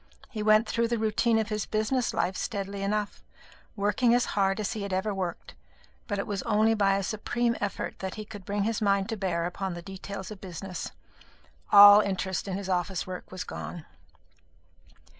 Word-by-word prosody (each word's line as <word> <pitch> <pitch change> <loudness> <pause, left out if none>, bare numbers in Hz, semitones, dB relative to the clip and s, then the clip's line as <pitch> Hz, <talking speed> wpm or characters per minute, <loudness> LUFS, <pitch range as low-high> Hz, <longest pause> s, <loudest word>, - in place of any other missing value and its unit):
He 220 -4 -4
went 215 +1 +4
through 235 0 +1
the 235 0 0
routine 225 +1 +2
of 220 -1 0
his 215 -1 -2
business 220 +3 0
life 185 +1 -1
steadily 200 -2 -4
enough, 205 +1 -2 0.5
working 210 +4 +2
as 245 - +2
hard 195 0 +1
as 210 +1 -2
he 220 - -5
had 200 -1 -4
ever 190 +3 0
worked; 185 -3 -4 0.5
but 205 -3 -2
it 195 - -2
was 200 -3 -3
only 215 +1 +3
by 200 -3 +3
a 195 - -2
supreme 235 +4 -1
effort 205 -1 -3
that 190 -1 -4
he 215 - -6
could 205 -2 -10
bring 205 +1 -1
his 220 +1 -1
mind 200 0 +2
to 225 - -1
bear 180 -4 -1
upon 185 +1 -3
the 175 - -7
details 195 +1 -7
of 205 - -9
business 185 -1 -6 0.8
all 205 0 +10
interest 190 -1 -2
in 190 -1 -2
his 200 -1 -6
office 185 -1 -1
work 185 -1 -8
was 185 -1 -5
gone. 170 -3 -7
200 Hz, 190 wpm, -28 LUFS, 190-215 Hz, 0.8 s, all